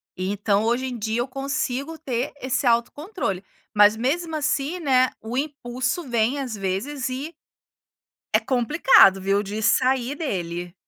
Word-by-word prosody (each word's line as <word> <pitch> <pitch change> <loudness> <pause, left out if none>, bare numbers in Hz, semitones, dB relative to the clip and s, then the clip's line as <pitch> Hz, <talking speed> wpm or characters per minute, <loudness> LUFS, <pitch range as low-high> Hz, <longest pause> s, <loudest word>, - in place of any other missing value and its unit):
E, 185 +1 -2
então, 205 0 +1
hoje 240 +3 0
em 250 -2 -4
dia, 220 +2 -2
eu 250 - -2
consigo 275 +2 -3
ter 260 -2 -3
esse 260 +1 -1
autocontrole. 235 - -1 0.3
Mas, 210 +1 +6
mesmo 320 +7 -1
assim, 300 +3 -1
né, 255 -4 +3
o 225 +3 -6
impulso 265 +1 -2
vem, 240 +4 +1
às 250 -5 -4
vezes, 220 +8 -3
e 275 +6 -5 1.0
é - - +5
complicado, 245 - +5
viu, 195 +2 +1
de 210 +2 -5
sair 255 +3 +2
dele. 175 - -4
255 Hz, 145 wpm, -23 LUFS, 210-280 Hz, 1.0 s, Mas